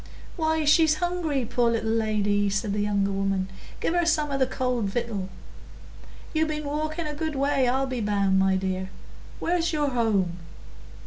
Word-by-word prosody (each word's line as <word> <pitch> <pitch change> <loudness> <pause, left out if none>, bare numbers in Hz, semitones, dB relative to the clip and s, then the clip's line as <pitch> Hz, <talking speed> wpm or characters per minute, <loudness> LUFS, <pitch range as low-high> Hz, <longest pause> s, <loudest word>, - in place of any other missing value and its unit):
"Why, 315 -2 0
she's 310 +1 +5
hungry, 325 -6 -1
poor 240 0 +1
little 225 -1 0
lady," 205 -2 +1
said 200 +1 -1
the 210 - -1
younger 200 -1 +1
woman. 195 -1 -1 0.3
"Give - - 0
her 350 0 +2
some 305 -3 +2
o' 275 - 0
the 260 - +3
cold 250 -3 -1
victual. 200 -2 -3 1.0
You've 315 0 +2
been 305 -1 -3
walking 310 +3 -2
a 300 - -3
good 315 0 -3
way, 275 -1 +2
I'll 265 +2 +1
be 255 -3 -3
bound, 200 -2 +2
my 190 0 +3
dear. 190 0 -2 0.5
Where's 345 0 0
your 295 -3 +1
home?" 200 -8 +1
245 Hz, 170 wpm, -26 LUFS, 200-305 Hz, 1.0 s, she's